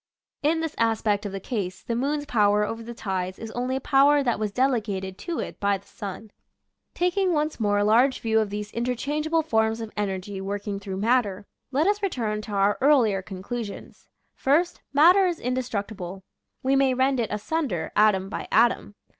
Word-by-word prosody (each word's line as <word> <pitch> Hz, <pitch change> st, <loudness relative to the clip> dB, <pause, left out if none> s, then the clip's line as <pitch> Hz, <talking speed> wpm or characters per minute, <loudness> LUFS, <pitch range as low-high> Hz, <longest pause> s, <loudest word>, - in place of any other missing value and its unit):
In 320 Hz, +3 st, +2 dB
this 325 Hz, -2 st, -3 dB
aspect 220 Hz, -2 st, +1 dB
of -, -, -6 dB
the 195 Hz, -, -4 dB
case, 195 Hz, -4 st, -4 dB
the 230 Hz, -, -2 dB
moon's 290 Hz, +4 st, -1 dB
power 210 Hz, -4 st, +3 dB
over 225 Hz, +2 st, -5 dB
the 235 Hz, +1 st, -8 dB
tides 190 Hz, -4 st, -3 dB
is 225 Hz, -1 st, -7 dB
only 250 Hz, +3 st, -2 dB
a -, -, 0 dB
power 285 Hz, +1 st, +4 dB
that 240 Hz, -5 st, 0 dB
was 215 Hz, -1 st, -1 dB
delegated 210 Hz, -7 st, 0 dB
to 335 Hz, -, -4 dB
it -, -, -5 dB
by 200 Hz, -1 st, +2 dB
the 195 Hz, -, -21 dB
sun. 205 Hz, +1 st, -8 dB, 0.6 s
Taking 360 Hz, +1 st, +1 dB
once 305 Hz, -2 st, -1 dB
more 205 Hz, -2 st, +2 dB
a 205 Hz, -, +2 dB
large 240 Hz, +6 st, +4 dB
view 220 Hz, -1 st, +2 dB
of 215 Hz, -2 st, 0 dB
these 210 Hz, +1 st, -5 dB
interchangeable 295 Hz, +7 st, -1 dB
forms 220 Hz, -6 st, +1 dB
of 225 Hz, -1 st, -6 dB
energy 195 Hz, -1 st, -3 dB
working 200 Hz, +1 st, -4 dB
through 195 Hz, -2 st, -6 dB
matter, 210 Hz, -2 st, +1 dB, 0.3 s
let 285 Hz, +4 st, +2 dB
us 410 Hz, +1 st, +2 dB
return 230 Hz, -, -1 dB
to 215 Hz, -, -9 dB
our 200 Hz, 0 st, +2 dB
earlier 245 Hz, -9 st, +4 dB
conclusions: 200 Hz, +3 st, -7 dB, 0.3 s
First, 320 Hz, +6 st, +1 dB
Matter 355 Hz, +7 st, +6 dB
is 345 Hz, -2 st, -2 dB
indestructible. 205 Hz, -7 st, -4 dB, 0.4 s
We 265 Hz, +1 st, +2 dB
may 270 Hz, -1 st, +3 dB
rend 260 Hz, 0 st, +2 dB
it 225 Hz, -, 0 dB
asunder, 210 Hz, -, -2 dB
atom 205 Hz, -3 st, +4 dB
by -, -, -5 dB
atom. 230 Hz, -2 st, +2 dB
225 Hz, 180 wpm, -25 LUFS, 205-275 Hz, 0.6 s, Matter